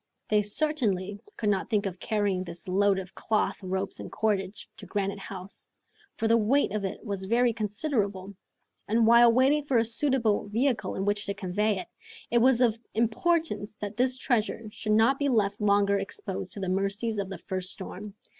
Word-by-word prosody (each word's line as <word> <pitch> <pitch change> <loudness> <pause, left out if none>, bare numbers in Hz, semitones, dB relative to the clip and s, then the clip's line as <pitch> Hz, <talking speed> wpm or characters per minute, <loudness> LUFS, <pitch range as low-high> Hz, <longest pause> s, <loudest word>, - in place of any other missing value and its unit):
They 210 -1 +4
certainly 205 -5 -1 0.2
could 215 - 0
not 195 -2 0
think 210 -3 +1
of 185 -2 -4
carrying 205 -4 0
this 170 +1 -7
load 195 +1 +3
of 185 -1 -6
cloth, 215 -1 -1
ropes, 190 +1 -3
and - - -8
cordage, 205 -2 -1
to - - -10
Granite 200 -1 -2
House, 190 0 -8 0.5
for 225 - 0
the 230 +1 +4
weight 245 +3 +2
of 210 -1 -2
it 195 +5 -5
was 200 -3 -4
very 235 +3 +2
considerable, 205 -3 -2 0.5
and 225 +2 +3
while 235 +1 +7
waiting 270 +5 +3
for 275 -3 +1
a 230 - +3
suitable 230 -3 +2
vehicle 235 +2 0
in 195 - -2
which 205 0 0
to 200 - -2
convey 205 +3 0
it, 185 - -6 0.4
it 235 - +4
was 255 +1 +4
of 230 -2 +3 0.2
importance 235 -1 0
that 210 0 -6
this 255 +2 +1
treasure 230 -3 0
should 215 0 -2
not 225 +5 +4
be 285 -1 +1
left 205 -4 +1
longer 200 -1 +3
exposed 190 -1 -5
to - - -6
the 190 - -3
mercies 200 +4 -1
of 195 -1 -3
the 195 - -6
first 185 +1 -3
storm. 200 +1 -7
210 Hz, 185 wpm, -28 LUFS, 195-230 Hz, 0.5 s, while